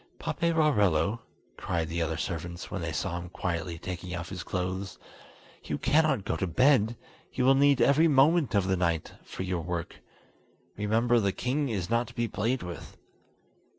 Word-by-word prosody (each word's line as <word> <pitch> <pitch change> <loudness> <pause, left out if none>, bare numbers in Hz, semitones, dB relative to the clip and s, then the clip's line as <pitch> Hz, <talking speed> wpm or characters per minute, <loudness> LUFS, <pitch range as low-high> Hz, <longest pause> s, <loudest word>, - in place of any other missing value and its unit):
"Paperarello," 115 - +1 0.4
cried 85 -2 -2
the 85 +2 -2
other 80 -1 -1
servants, 85 +1 -5
when 95 - -3
they 80 -1 -3
saw 85 +2 -2
him 90 0 -8
quietly 85 -1 -3
taking 90 +1 -6
off 85 -1 -5
his 95 -2 -5
clothes, 95 +1 -3 0.7
"you 75 - -3
cannot 150 - +2
go - - -1
to 95 +3 -2
bed; 120 - +3 0.3
you 125 - 0
will 135 - +7
need 140 -1 +4
every 155 +4 +5
moment 145 -2 +4
of 100 -2 +2
the 95 - +2
night 85 -3 -1
for - - -6
your 90 -2 -2
work. 85 0 -4 0.8
Remember, 115 +3 +2
the 100 -3 +1
king 135 +7 -1
is 95 -6 -2
not 115 0 +2
to - - -13
be 120 0 0
played 115 +3 -1
with!" 90 -1 -8
95 Hz, 170 wpm, -28 LUFS, 85-125 Hz, 0.8 s, will